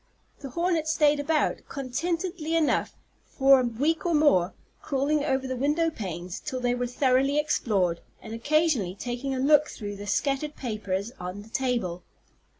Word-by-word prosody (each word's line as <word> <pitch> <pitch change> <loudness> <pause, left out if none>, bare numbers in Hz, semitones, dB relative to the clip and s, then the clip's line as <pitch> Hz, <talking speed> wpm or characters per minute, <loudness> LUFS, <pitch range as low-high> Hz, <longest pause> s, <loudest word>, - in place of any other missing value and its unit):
The 275 - -7
hornet 335 +2 0
stayed 300 -2 +3
about, 305 +2 +1
contentedly 330 +5 -2
enough, 320 -3 +1 0.3
for 270 -1 +4
a - - +1
week 285 +8 0
or 345 -2 +1
more, 195 - +3 0.3
crawling 285 +2 0
over 265 -2 0
the 260 0 -3
window 300 +6 +1
panes 180 - -6
till 265 -4 -4
they 245 -1 +1
were 245 0 -1
thoroughly 265 +3 +2
explored, 205 - +1 0.2
and 220 - -9
occasionally 270 - +1
taking 245 +5 -3
a - - -2
look 295 +2 +5
through 205 -2 -6
the 205 +1 -8
scattered 285 +5 -1
papers 210 -3 -3
on 180 +3 -6
the 220 - -16
table. 235 -9 -1
265 Hz, 155 wpm, -27 LUFS, 225-300 Hz, 0.3 s, look